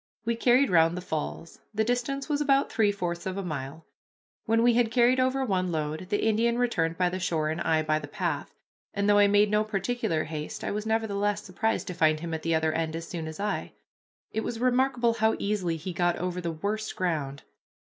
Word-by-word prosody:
We 235 0 +1
carried 250 +2 +3
round 165 0 +4
the - - -2
falls. 165 -1 -5 0.2
The 220 - +2
distance 245 +4 -1
was 295 -1 0
about 275 -1 +2
three 215 -2 +3
fourths 175 -3 -4
of 190 0 -3
a 195 - -2
mile. 150 0 -5 0.6
When 225 +1 +3
we 240 0 +5
had 235 -1 +3
carried 245 +2 +3
over 260 +1 +1
one 185 -5 0
load, 155 +2 -3
the 205 - 0
Indian 230 +2 +2
returned 165 -10 0
by 180 -1 +2
the 185 +1 -4
shore, 160 -4 0
and 160 +2 -3
I 160 -2 +2
by 155 0 +1
the - - -8
path; - - -3 0.4
and 200 0 0
though 205 0 +5
I 205 - +6
made 205 +1 +4
no 210 0 +3
particular 215 -4 -1
haste 155 -1 -6
I - - -2
was 210 +1 -3
nevertheless 205 -2 0
surprised 220 +4 -1
to 180 - -5
find 155 -2 +2
him 165 0 -5
at 160 - -3
the 165 0 +1
other 160 0 +1
end 160 0 -1
as 165 0 -5
soon 165 -3 -5
as 160 +2 -8
I. 205 +1 -2 0.6
It 220 - -1
was 230 - -4
remarkable 250 -1 +2
how 220 -1 +2
easily 190 -5 -1
he 175 +3 -6
got 175 0 +1
over 180 0 -3
the 170 -1 -2
worst 210 +7 -3
ground. 150 -6 -2
195 Hz, 220 wpm, -27 LUFS, 165-225 Hz, 0.6 s, I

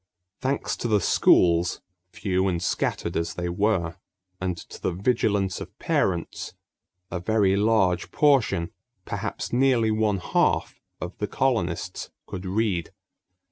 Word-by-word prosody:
Thanks 135 +1 -1
to - - -2
the 105 -2 +3
schools, 85 -1 +4 0.3
few 95 0 0
and 90 -2 0
scattered 90 - -1
as 85 0 -1
they 90 0 -2
were, 90 -3 0 0.4
and 90 -2 -2
to - - -11
the - - 0
vigilance 100 -1 0
of - - -9
parents, 85 -3 -1 0.6
a 90 - -2
very 100 0 +2
large 100 -4 +2
portion, 115 - +2 0.3
perhaps - - -4
nearly 120 -3 +3
one 110 -2 +1
half, 90 - +1 0.2
of 90 +1 -6
the 105 - -1
colonists 100 -9 -1 0.2
could 95 0 -6
read. 95 -3 0
95 Hz, 130 wpm, -25 LUFS, 90-110 Hz, 0.6 s, schools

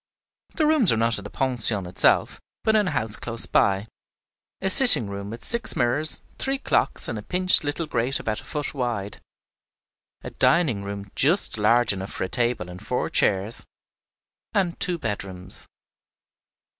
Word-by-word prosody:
The 315 - 0
rooms 300 - +3
were 115 - +2
not 115 -1 +1
in - - -12
the 105 - -9
pension 115 -7 +5
itself, 90 - 0 0.2
but 220 - +1
in 210 -3 +1
a - - 0
house 110 -8 0
close 115 -1 -1
by, 100 +1 0 0.7
a 190 - -3
sitting 215 - +8
room 100 0 -7
with 115 +2 -9
six 235 -1 +2
mirrors, 140 +6 +1 0.2
three 270 +1 -1
clocks, - - 0
and - - -5
a - - -9
pinched 185 -1 +2
little 145 +3 -4
grate 125 -1 -2
about 110 -1 -4
a - - -20
foot 150 -2 -6
wide, 115 -7 -5 1.0
a - - -8
dining 140 - 0
room 100 -1 -8
just 165 +9 +1
large 115 +2 +2
enough 95 0 -8
for - - -5
a 95 - -5
table 120 -7 -2
and 90 +3 -12
four 125 +3 -4
chairs, 100 +3 -1 0.9
and 180 -4 -1
two 180 -1 -1
bedrooms. 95 - -7
120 Hz, 165 wpm, -23 LUFS, 100-170 Hz, 1.0 s, sitting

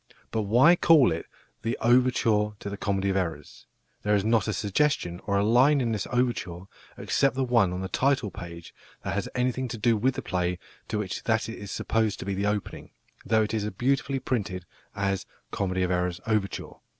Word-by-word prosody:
But 110 - 0
why 130 +10 +6
call 155 - +5
it 80 0 -4 0.3
the 115 +2 -2
"Overture 115 -3 +3
to 100 - -6
The - - -3
Comedy 100 -1 -1
of - - -2
Errors"? 85 -6 -4 0.3
There 105 0 +2
is 100 0 +1
not 115 0 +2
a - - +1
suggestion 100 -5 0
or 100 -1 +2
a 100 - +2
line 130 +6 +5
in 120 -3 0
this 105 -3 -2
overture, 120 -9 -1 0.4
except 135 -1 +1
the 135 - 0
one 115 -7 +3
on 90 +1 -4
the 95 - -3
title 130 -2 +1
page, 85 -1 -9 0.3
that - - -2
has 100 0 -2
anything 130 +1 0
to 115 - -5
do 115 +2 +3
with 125 +5 +1
the - - -4
play 90 -1 -1 0.3
to 105 - -2
which 100 -3 -4
that 110 -1 +1
is 105 -3 -7
supposed 110 0 0
to - - -7
be 100 - -2
the 100 +2 -1
opening, 105 -1 -3 0.4
though 110 +1 +3
it 105 - -3
is 105 -1 -1
beautifully 135 +6 0
printed 100 -8 -3 0.3
as 100 -1 -1 0.2
"Comedy 95 -1 -1
of 90 - 0
Errors 90 -1 0
Overture." 105 -3 -2
105 Hz, 200 wpm, -27 LUFS, 95-120 Hz, 0.4 s, why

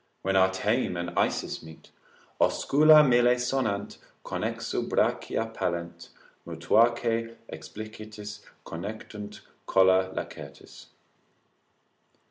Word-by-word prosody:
When 95 0 0
our 95 0 +4
Thame 100 0 0
and 85 0 -4
Isis - - -1
meet 80 -1 -14 0.5
Oscula 150 +1 +5
mille 120 0 +4
sonant, 125 -5 -2 0.3
connexu - - -3
brachia 115 0 0
pallent, 85 -3 -4 0.3
Mutuaque 115 +7 +1 0.2
explicitis 105 +4 -9 0.3
connectunt 105 +3 -7 0.3
colla 95 0 +4
lacertis. - - -9
105 Hz, 85 wpm, -27 LUFS, 95-115 Hz, 0.5 s, Oscula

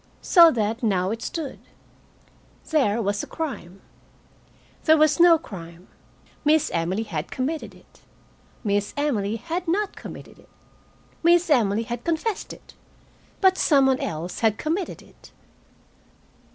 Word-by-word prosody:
So 340 -3 +7
that 225 0 -1
now 190 -4 +1
it 225 +1 -4
stood: 310 -1 -5 1.1
there 235 -9 +2
was 205 0 -1
a - - -7
crime. 205 - -6 1.0
There 315 0 +6
was 305 0 +3
no 340 -1 +7
crime. 175 - -11 0.5
Miss 305 0 +3
Emily 175 +6 -1
had 160 -8 -5
committed 295 +5 -4
it. - - -22 0.6
Miss 205 -1 -1
Emily 225 -8 0
had 335 - -4
not 400 +5 -1
committed - - -11
it. - - -21 0.7
Miss 345 0 +3
Emily 225 -5 +2
had 240 0 -6
confessed 340 +6 -2
it, - - -14 0.7
but 380 -1 +4
some 280 -4 +4
one 265 -1 +2
else 165 +3 -4
had 220 -2 +2
committed 330 +7 -3
it. - - -19
250 Hz, 130 wpm, -24 LUFS, 205-320 Hz, 1.1 s, So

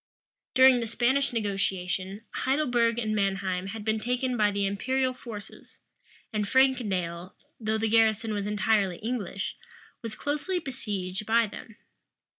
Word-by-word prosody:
During 260 -1 +7
the 230 - -2
Spanish 260 +5 +2
negotiation, 195 -2 -2
Heidelberg 245 -4 +1
and 215 -2 -1
Manheim 190 -2 0
had 210 +1 -6
been 220 0 +1
taken 250 +2 -1
by 210 -3 +3
the 200 -1 0
imperial 255 +6 0
forces; 225 -5 -10 0.6
and 210 -1 0
Frankendale, 195 -9 +1 0.2
though 220 -1 0
the 220 0 0
garrison 220 0 +3
was 205 -1 -2
entirely 210 -3 +1
English, 210 -3 -3 0.4
was 225 -3 -5
closely 295 +9 -2
besieged 210 - -4
by 230 +1 +4
them. 210 +1 -10
220 Hz, 130 wpm, -28 LUFS, 200-245 Hz, 0.6 s, During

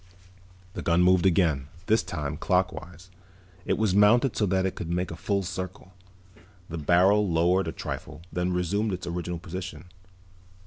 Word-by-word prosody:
The - - -5
gun 85 +1 +3
moved 90 0 +4
again, 80 -7 +2 0.2
this 110 +3 +3
time 75 0 -4
clockwise. 90 0 -2 0.6
It - - +1
was 110 -4 +1
mounted 110 +5 +4
so 105 - +1
that 95 +1 +1
it 95 - -1
could 85 - -6
make 90 0 -1
a - - -5
full 100 +3 -1
circle. 95 +1 -6 0.8
The 80 0 -5
barrel 95 +6 +4
lowered 85 +3 +2
a - - -2
trifle, 80 - -7
then 90 +1 0
resumed 95 +4 0
its 90 - -5
original 85 0 -3
position. 90 +1 -8
90 Hz, 155 wpm, -27 LUFS, 85-95 Hz, 0.8 s, moved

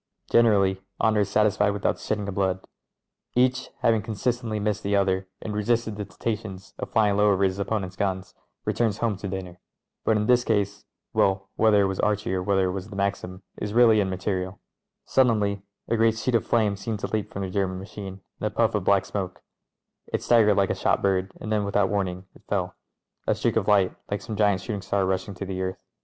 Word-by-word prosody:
Generally 100 -5 +4 0.2
honour 110 -1 +3
is 100 -1 +1
satisfied 105 -1 +3
without 100 -1 0
the - - -15
shedding 105 -1 -2
of 100 - -3
blood; 95 -1 -1 0.7
each, 125 +1 +2
having 115 -2 +3
consistently 115 +1 -2
missed 105 0 -1
the 100 0 0
other 95 -1 +1 0.2
and 110 - -4
resisted 110 +1 0
the 105 0 -4
temptations 95 0 -5
of - - -5
Sying 105 -3 +3
low 105 0 +5
over 100 0 +2
his 95 0 +1
opponents' 100 -2 -2
guns, 95 -1 -2 0.3
returns 110 -3 +1
home 115 -3 0
to 100 - -5
dinner. 90 -2 -6 0.4
But 110 - +3
in 105 - 0
this 125 +1 +4
case 100 -3 0
— - - -38
^well, 95 0 +3
whether 110 -2 +4
it - - +3
was 95 -1 -2
Archie 105 -2 0
or 95 - 0
whether 95 0 +2
it - - -1
was 95 +2 -5
the 105 - -9
Maxim 100 -1 -2
is 105 +1 -4
really 115 -3 +6
immaterial. 95 0 -2 0.5
Suddenly 105 -6 +2 0.3
a 115 - +1
great 115 0 +3
sheet 125 +3 -1
of 115 - +2
flame 110 -4 +2
seemed 105 +2 -4
to - - -1
leap 110 -2 -1
from 100 - -4
the 95 - -4
German 95 -1 -1
machine 95 0 -8 0.2
and 110 - -1
a - - 0
puff 110 +1 +1
of 105 -3 0
black 100 0 +3
smoke: 100 -2 -5 0.6
it - - -3
staggered 110 -4 +5
like 100 -1 +2
a - - +2
shot - - 0
bird 95 -1 +1
and 110 - -5
then, 105 -1 +2
without 100 -1 +1
warning, 95 -2 -2
it - - -19
fell 95 -3 -1 0.3
— - - -49
a - - +3
streak - - 0
of - - +1
light, 100 -3 +4
like 100 -1 -2
some 110 0 -5
giant 100 -3 +2
shooting 105 0 -4
star 100 0 0
rushing 95 +2 -2
to 100 - -5
the 95 -1 -4
earth. 95 0 -4
100 Hz, 215 wpm, -25 LUFS, 95-110 Hz, 0.7 s, really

